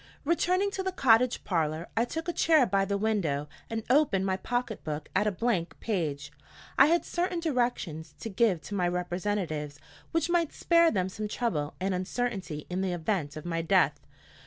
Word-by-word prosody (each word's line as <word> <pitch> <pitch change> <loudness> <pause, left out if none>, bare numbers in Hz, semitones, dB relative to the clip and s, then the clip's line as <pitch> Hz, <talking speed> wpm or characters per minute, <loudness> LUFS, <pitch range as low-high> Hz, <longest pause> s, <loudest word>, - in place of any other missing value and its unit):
RETURNING 365 +5 +2
to 390 - -3
the 380 0 -1
cottage 250 -6 +3
parlor, 160 -2 -1
I 230 +1 +2
took 325 +6 -5
a 345 - -1
chair 315 -6 +4
by 195 -2 +1
the 200 0 -1
window 185 -10 0 0.2
and 225 -1 -3
opened 250 -8 +3
my 190 -1 +1
pocket 240 +3 -3
book 150 -1 -5
at 210 - +3
a - - +2
blank 190 -5 -1
page. 155 -10 -2 0.4
I 275 - +7
had 340 +2 +2
certain 355 0 -1
directions 240 - -2
to - - -5
give 195 -4 +2
to 205 - -8
my 180 -3 +1
representatives, 175 -4 -2 0.3
which 330 -1 +1
might 345 -2 +1
spare 335 -1 +4
them 185 - 0
some 210 +3 -4
trouble 185 - -2
and 190 +1 0
uncertainty 185 -4 -3
in 180 +1 -2
the 190 -2 -1
event 165 -4 -2
of 155 - -8
my 165 -1 -1
death. 165 - +3
200 Hz, 185 wpm, -29 LUFS, 170-250 Hz, 0.4 s, I